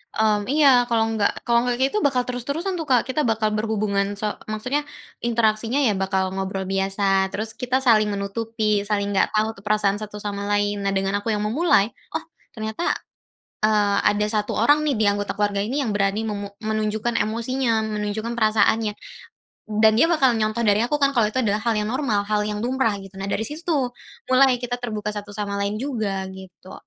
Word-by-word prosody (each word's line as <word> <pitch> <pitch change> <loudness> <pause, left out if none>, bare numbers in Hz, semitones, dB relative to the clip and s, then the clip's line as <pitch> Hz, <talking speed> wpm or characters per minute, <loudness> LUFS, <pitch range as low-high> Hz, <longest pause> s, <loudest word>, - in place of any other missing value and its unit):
mmm 210 -1 +1
iya 295 -1 +5 0.2
kalau 230 -2 +2
nggak 210 -2 +1
kalau 235 0 +2
nggak 245 - +1
kayak 265 +2 +1
gitu 425 - 0
bakal 250 -2 0
terus-terusan 280 +10 -3
tuh 315 - -4
Kak 250 -3 +4
kita 300 +4 0
bakal 220 -1 +1
berhubungan 210 -2 0
so - - -2 0.3
maksudnya 250 +7 -1 0.5
interaksinya 225 +2 +1
ya - - +3
bakal 190 0 0
ngobrol 190 0 -3
biasa 195 +1 -1 0.3
terus 215 +2 -3
kita 250 +1 0
saling 215 -4 +5
menutupi, 210 0 -1
saling 200 -1 0
nggak 195 - +3
tahu 215 +1 +3
tuh - - -18
perasaan 205 -1 +2
satu 210 -1 -8
sama 200 0 -3
lain, 205 0 +1
nah 195 - +1
dengan 195 +1 0
aku 205 - -9
yang 210 - -2
memulai, 225 - +2 0.2
oh 320 - -2 0.3
ternyata, 220 +7 -4 0.8
eee, 205 -2 +2
ada 210 0 +1
1 210 -1 -1
orang 290 +7 +4
nih 285 - +2
di 215 - +1
anggota 205 0 -2
keluarga 205 -1 0
ini 260 +8 -1
yang 225 - -1
berani 200 +1 0
memu 205 -2 -3 0.2
menunjukkan 215 +1 -1
emosinya 230 +1 0
,menunjukkan 215 +2 -3
perasaannya, 215 -1 +2 0.9
dan 220 0 +7
dia 325 - +6
bakal 275 -7 +3
nyontoh 220 +1 0
dari 205 0 +3
aku 245 +6 +1
kan 280 -1 +2
kalau 230 -4 +3
itu 215 - -3
adalah 210 0 +1
hal 230 0 0
yang 210 0 -1
normal, 255 -7 0
hal 210 0 0
yang 210 0 -3
lumrah 250 -4 +1
gitu, 195 - -14
nah 195 - -4
dari 220 +2 -1
situ 300 +5 -6
tuh, 290 -6 +2 0.5
mulai 260 -1 +5
kita 245 0 -4
terbuka 210 -3 -3
satu 205 0 -7
sama 205 -1 -3
lain 200 +1 -1
juga 215 -7 -2
gitu. 190 0 -12
215 Hz, 190 wpm, -23 LUFS, 205-240 Hz, 0.9 s, dan